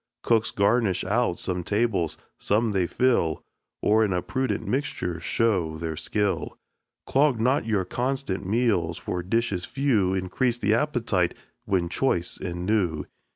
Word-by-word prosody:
Cooks 115 0 +2
garnish 100 -2 +2
out 105 -1 +1
some 90 -1 -2
tables, 100 -6 0 0.2
some 110 +2 +1
they 95 -3 +1
fill, 100 - +1 0.4
Or 110 +1 +4
in 100 -3 +1
a 90 - -1
prudent 130 -6 -2
mixture 100 - -2
show 85 -3 0
their 80 0 -4
skill. 100 +3 -1 0.5
Clog 135 -3 +2
not 125 +1 +2
your 105 -4 +1
constant 125 -2 -2
meals; 100 -6 +1
for 90 - -3
dishes 100 -1 -1
few 110 -10 +1
Increase 95 +7 0
the 105 -2 +1
appetite 115 - +1 0.3
when 90 -3 +1
choice 90 -3 0
and 90 0 -4
new. 90 -7 0
100 Hz, 140 wpm, -26 LUFS, 90-120 Hz, 0.5 s, Or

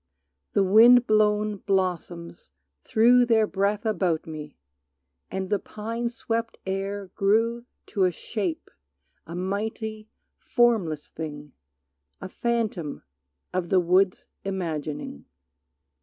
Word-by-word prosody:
The 200 - +4
wind 235 +5 +7
blown 210 -1 +2
blossoms 180 - -2 0.3
threw 245 +3 +5
Their 225 -2 +4
breath 205 +2 -1
about 180 -6 0
me, 150 -2 -8 0.7
and 190 0 -4
the 205 - +2
pine 230 +4 -4
swept 230 -1 -3
air 195 0 -3
Grew 225 +4 +1 0.2
to 195 -4 +1
a 180 - +2
shape, 180 0 -4 0.6
a 170 - -7
mighty, 215 +3 -3 0.3
formless 210 - +1
thing, 150 -2 -7 0.7
A - - -6
phantom 220 -10 -2 0.5
of 180 -2 -1
the 190 - +4
wood's 185 +2 +2 0.2
imagining. 155 - -4
195 Hz, 105 wpm, -26 LUFS, 175-220 Hz, 0.7 s, wind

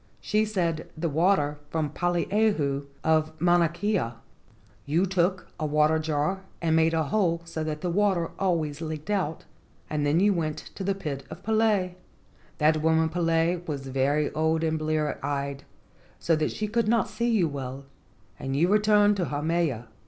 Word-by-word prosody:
She 215 +1 +1
said, 170 -7 -2
'The 165 +1 -1
water 150 -2 +2
from 155 -3 -1
Poliahu 175 -5 0 0.2
of 160 0 +1
Mauna 175 0 +4
Kea.' 175 - -1 0.7
You 165 +6 +2
took 185 0 0
a 155 - -1
water 150 +1 +3
jar 155 +4 -1 0.2
and 160 -1 +1
made 160 0 +3
a 160 - +2
hole 170 0 0
so 165 -1 -4
that 155 -1 -4
the 180 - -1
water 190 -3 +1
always 160 -6 0
leaked 155 +3 -5
out, 175 -6 -1 0.5
and 150 -1 0
then 145 +3 +2
you 205 +2 +4
went 155 -4 -2 0.2
to 195 - -6
the 195 +1 0
pit 145 -8 -5
of - - -10
Pele. 215 -4 +2 0.6
That 155 0 +3
woman 160 0 +3
Pele 165 +1 +1
was 140 -3 -4
very 140 +3 +1
old 160 +1 +1
and 160 -1 0
blear 155 -1 -1
eyed, 140 -1 -3 0.5
so 165 - +1
that 155 0 0
she 215 - -3
could 230 +1 0
not 225 -2 +2
see 235 +3 -1
you 210 -8 +3
well, 135 -1 -6 0.5
and 135 0 -3
you 170 +5 +3
returned 210 0 +4
to 180 - 0
Haumea. 150 -5 -1
160 Hz, 165 wpm, -26 LUFS, 150-190 Hz, 0.7 s, Mauna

